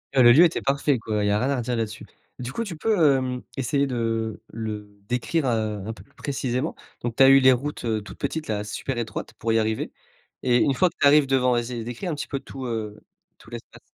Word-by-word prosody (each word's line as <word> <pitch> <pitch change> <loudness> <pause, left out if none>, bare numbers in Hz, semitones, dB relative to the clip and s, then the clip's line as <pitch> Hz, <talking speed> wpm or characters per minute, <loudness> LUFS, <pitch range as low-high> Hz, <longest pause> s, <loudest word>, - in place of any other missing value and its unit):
Heu, 130 - +6
le 120 - +9
lieu 150 +8 +8
était 170 -1 +2
parfait, 140 -1 +1
quoi. 105 -2 -2
Il - - +1
y - - +2
a 105 - +2
rien 130 +3 0
à 140 - +1
redire 120 0 -2
là-dessus. 110 -1 -4 0.3
Du 125 0 -5
coup, 230 - -2
tu 190 -6 -6
peux, 165 -9 +3
hem, 125 -1 -3 0.2
essayer 140 +2 +1
de 115 -3 -2
le 105 -2 -5 0.2
décrire, 130 +5 0
heu, 110 -4 -1
un 110 - -4
peu - - -14
plus 140 - -28
précisément? 135 +1 -2 0.3
Donc 120 -1 -3
tu 135 - +6
as 135 - +8
eu 135 0 +8
les 130 -1 +6
routes, 130 +1 -2
heu, 110 -2 0
toutes 100 - -11
petites, 160 -1 -3
là, 105 -1 -2
super 120 +5 -4
étroites 110 -3 -4
pour 115 0 -1
y 115 - +4
arriver 110 0 -1 0.5
et 120 -1 +4
une 135 +3 +3
fois 180 +7 +3
que - - -25
tu - - +5
arrives 145 0 +6
devant, 130 -2 +3
vas-y, 120 0 -2
décris 120 +9 -6
un 170 - -1
petit 145 - -5
peu 140 - -3
tout, 135 -1 -8
heu, 110 -3 -4 0.4
tout - - -17
l'espace. - - -10
125 Hz, 250 wpm, -24 LUFS, 110-140 Hz, 0.5 s, le